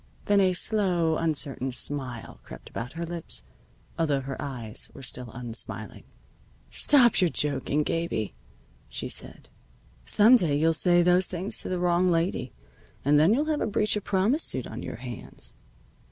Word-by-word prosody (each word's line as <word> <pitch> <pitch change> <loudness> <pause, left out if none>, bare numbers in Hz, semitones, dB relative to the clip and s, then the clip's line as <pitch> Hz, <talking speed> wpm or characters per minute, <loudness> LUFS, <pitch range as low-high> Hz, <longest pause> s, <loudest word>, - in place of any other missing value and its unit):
Then 205 0 +4
a 185 -2 +4
slow, 180 -5 +1
uncertain 140 -5 -1
smile 125 - -3
crept - - -12
about 120 +2 -5
her 165 +1 -4
lips, 170 - -5 0.6
although 145 -4 +1
her 135 0 -5
eyes 120 -6 -2
were - - -10
still 125 -1 -5
unsmiling. 115 -3 -7 0.7
"Stop 250 -8 +5
your 180 - +4
joking, 145 0 0
Gabie," 165 - -2 0.6
she - - -1
said. - - -1 0.5
"Some 220 - +6
day 155 -9 +1
you'll 165 +2 +3
say 175 +1 +4
those 180 +1 +3
things 185 +2 -2
to - - -5
the 185 - -1
wrong 180 +1 +2
lady, 170 +1 0 0.5
and 145 +1 +5
then 160 +6 +5
you'll 290 +4 +1
have 310 -1 -1
a - - 0
breach 210 0 +2
of 210 - -3
promise 210 - +1
suit 130 - -2
on 110 - -7
your - - -6
hands." 120 -1 -6
165 Hz, 160 wpm, -27 LUFS, 130-185 Hz, 0.7 s, Some